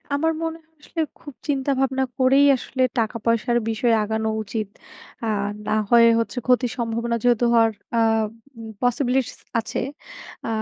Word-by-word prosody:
আমার 320 +3 +1
মনে 325 0 -3
হয় 320 0 -37
আসলে, 325 - -8 0.2
খুব 290 - -10
চিন্তা 275 -1 0
ভাবনা 265 0 +1
করেই 270 +2 +5
আসলে 260 +1 -5 0.2
টাকা-পয়সার 230 +1 +1
বিষয় 225 +1 +1
আগানো 220 +1 -1
উচিত। 215 0 -4 0.6
আ - - -1 0.4
না - - -1 0.2
হয় 235 -1 +7
হচ্ছে, 230 +2 -3
ক্ষতির 250 -1 +3
সম্ভাবনা 235 0 -1
যেহেতু 240 -1 +3
হওয়ার 225 -1 +5 0.3
আ - - +4 0.8
পসিবিলিটিস 250 0 0 0.2
আছে, 225 - -3 0.7
আ - - -3
240 Hz, 140 wpm, -23 LUFS, 230-265 Hz, 0.8 s, হয়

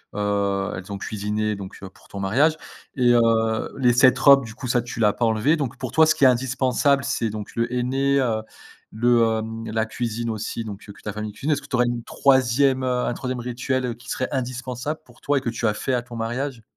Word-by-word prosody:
heu, 100 -1 0
elles 90 +2 -8
ont 100 - -3
cuisiné 105 +1 -2
donc, 100 -1 -8
heu, 95 - -7
pour - - -22
ton 100 - -8
mariage 135 +12 +2 0.4
et 125 -3 +4
heu, 120 - +5 0.6
les 125 -3 +3
cette 130 +1 +5
robe, 135 0 +6
du 110 -1 -10
coup, 125 - -6
ça, 120 0 +2
tu 120 0 -8
l'as 105 -2 +4
pas 120 - 0
enlevée. 115 +8 +2
Donc 140 -6 -3
pour 130 - -5
toi, 160 0 +5
ce - - +3
qui - - -1
est - - +9
indispensable, 130 +2 +2
c'est, 140 -5 -1
donc, 105 -1 -7
le 115 0 +1
henné, 135 +3 +1
heu, 115 -4 0 0.5
le, 120 +1 +3 0.2
hem, 115 0 -6
la 110 0 0
cuisine 115 +1 -3
aussi 110 +1 -4
donc, 105 -2 -7
heu, - - -8
que - - -18
ta 105 - -4
famille 105 0 -5
cuisine. 145 +8 -2
Est-ce 145 - +1
que - - -14
tu - - -2
aurais 125 0 +3
une 120 -1 -2
3e, 130 +1 +2
heu, 125 -1 0
un - - -1
3e 125 0 -4
rituel, 125 +2 -2
heu, 120 - -2
qui 120 +1 -14
serait 130 - -2
indispensable 130 +2 -4
pour 120 - -20
toi 145 0 +1
et - - 0
que 120 - -2
tu 115 0 -1
as 105 - +1
fait 130 - -2
à 125 - +1
ton 120 0 -11
mariage? 120 +2 -3
120 Hz, 245 wpm, -23 LUFS, 110-130 Hz, 0.6 s, est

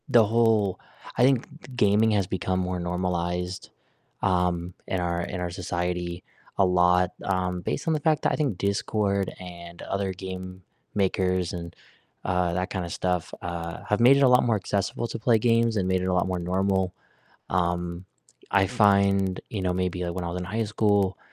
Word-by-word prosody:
The 120 -4 +6
whole 110 -3 +2 0.4
I - - +4
think 130 -2 +4
g - - -14
g - - -13
gaming 105 0 +4
has 100 -3 +1
become 95 0 -1
more 90 0 -2
normalized, 90 0 -2 0.5
um, 90 -2 0
in 95 - -1
our 85 -1 -1
in 90 +1 -4
our 90 - -2
society 90 -1 -3 0.3
a 100 - +5
lot, 90 0 +3
um, 90 -2 -1
based 85 - -3
on 160 - +3
the 155 - 0
fact 155 +1 +1
that - - +3
I - - +2
think 140 - -1
Discord, 100 0 0
and 85 -1 -10
other 100 -1 -2
game 95 0 -7 0.3
makers, 95 -2 +1
and, 85 -1 -6 0.5
uh, 90 -2 +1
that 90 +3 -1
kind 90 -3 -3
of 85 - -6
stuff, 90 -2 -1
uh, 85 -1 -5
have 105 - +2
made 130 +3 +7
it - - +2
a - - +7
lot 125 0 +5
more 115 -2 +2
accessible 100 +4 -2
to 115 - -5
play 115 +1 +4
games, 115 0 +2
and 95 -2 0
made 95 0 +1
it - - -2
a 95 - +1
lot 90 0 +2
more 90 -1 -2
normal, 95 +1 0 0.6
um, 90 0 -1 0.5
I 95 -1 +4
find 100 -4 +3
you 105 - -3
know, 90 -1 +1
maybe, 90 -1 -1
like, 85 -1 -3
when 90 -1 -3
I - - -2
was 90 - -3
in 90 - -4
high 110 +5 -1
school, 100 -3 +1
95 Hz, 195 wpm, -26 LUFS, 90-100 Hz, 0.6 s, made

